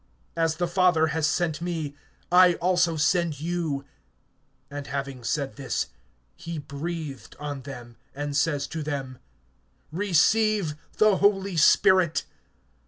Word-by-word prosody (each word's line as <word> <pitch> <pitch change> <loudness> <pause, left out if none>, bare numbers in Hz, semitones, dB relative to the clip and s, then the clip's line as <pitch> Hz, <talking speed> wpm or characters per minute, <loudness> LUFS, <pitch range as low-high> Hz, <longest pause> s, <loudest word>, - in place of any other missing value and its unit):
As 165 -1 +1
the 175 +1 -1
Father 175 -2 +3
has 160 -1 +1
sent 160 -1 -1
me, 160 -5 -3 0.4
I 180 -1 +7
also 180 -1 +2
send 155 -1 +1
you. 160 -4 -2 0.9
(22)And 145 -1 -6
having 135 -2 -4
said 140 +2 -2
this, 135 -2 -2 0.5
he 170 - -6
breathed 150 0 -6
on 145 -2 -5
them, 120 -3 -10 0.2
and 145 0 -4
says 145 -1 +1
to 160 - -4
them: 135 -4 -4 0.7
Receive 205 +1 +2 0.2
the 215 -3 +5
Holy 195 -1 +2
Spirit. 170 +1 +4
160 Hz, 120 wpm, -26 LUFS, 145-175 Hz, 0.9 s, I